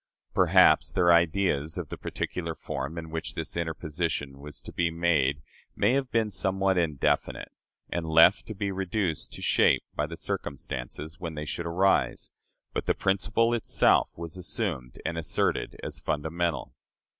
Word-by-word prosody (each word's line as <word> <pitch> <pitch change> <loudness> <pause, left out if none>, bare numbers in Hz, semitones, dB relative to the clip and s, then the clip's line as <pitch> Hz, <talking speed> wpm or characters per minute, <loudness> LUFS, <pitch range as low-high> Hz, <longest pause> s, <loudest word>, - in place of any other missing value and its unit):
Perhaps - - +5
their 85 -1 +5
ideas 85 -2 +2
of 85 -5 -4
the - - -4
particular 85 -2 -4
form 75 +2 -5
in 80 -1 -6
which 80 0 -4
this - - -4
interposition 80 -4 -3
was 75 +1 -8
to - - -10
be 85 -1 +1
made 75 -4 +1 0.3
may 105 +5 +3
have 135 -1 0
been 110 -3 +1
somewhat 95 0 +1
indefinite; 80 -6 0 0.4
and 85 -2 -3
left 80 +4 +6
to 110 - -6
be 100 0 -2
reduced 95 -3 -1
to - - -8
shape - - +4
by 75 - -1
the 85 +1 -7
circumstances 75 +5 -5
when 85 -3 -5
they 75 0 -4
should 85 +3 -4
arise, 95 +3 +1 0.4
but - - -3
the - - +3
principle 105 +5 +1
itself 120 - +2
was 85 +1 -6
assumed 65 -8 -3
and 85 0 -2
asserted 80 - -1
as - - -4
fundamental. 80 +3 -2
85 Hz, 155 wpm, -28 LUFS, 80-95 Hz, 0.4 s, left